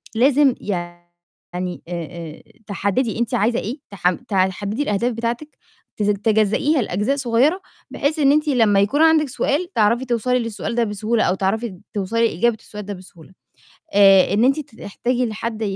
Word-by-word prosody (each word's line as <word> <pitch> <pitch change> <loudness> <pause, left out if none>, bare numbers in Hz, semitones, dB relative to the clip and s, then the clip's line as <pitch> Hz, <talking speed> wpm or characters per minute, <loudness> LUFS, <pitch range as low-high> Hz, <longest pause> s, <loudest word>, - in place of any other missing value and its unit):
لازم 270 +2 +4
يعني 175 -1 -7
آآ 175 - -6
آآ 165 -1 -7 0.2
تحددي 205 +3 -1
أنتِ 235 -2 -1
عايزة 230 +4 +1
إيه 250 +8 -5
تحم 180 -2 0
تحددي 200 +2 -1
الأهداف 235 0 0
بتاعتِك 235 +6 -4 0.4
تزج 205 -1 +1
تجزّئيها 220 +7 +2
لأجزاء 210 +7 -1
صغيّرة، 270 +8 +2 0.3
بحيث 305 +3 -1
إن 280 -1 +5
أنتِ 305 +1 +2
لمّا 220 -7 +3
يكون 280 +10 +1
عندِك 315 -3 +4
سؤال 300 +7 -1
تعرفي 235 +3 +2
توصلي 250 +1 0
للسؤال 230 -1 -4
ده 240 - +2
بسهولة، 220 +2 -1
أو 185 - +1
تعرفي 215 +5 -1
د 185 -3 -14
توصلي 225 +3 +1
لإجابة 225 +6 0
السؤال 210 -1 -9
ده 205 - -5
بسهولة، 180 -2 -15 0.6
آآ 195 -2 +6
إن 215 +4 +3
أنتِ 275 +3 +2
ت 275 -6 -10
تحتاجي 245 +5 -1
لحد 220 +1 -5
220 Hz, 160 wpm, -20 LUFS, 195-250 Hz, 0.6 s, آآ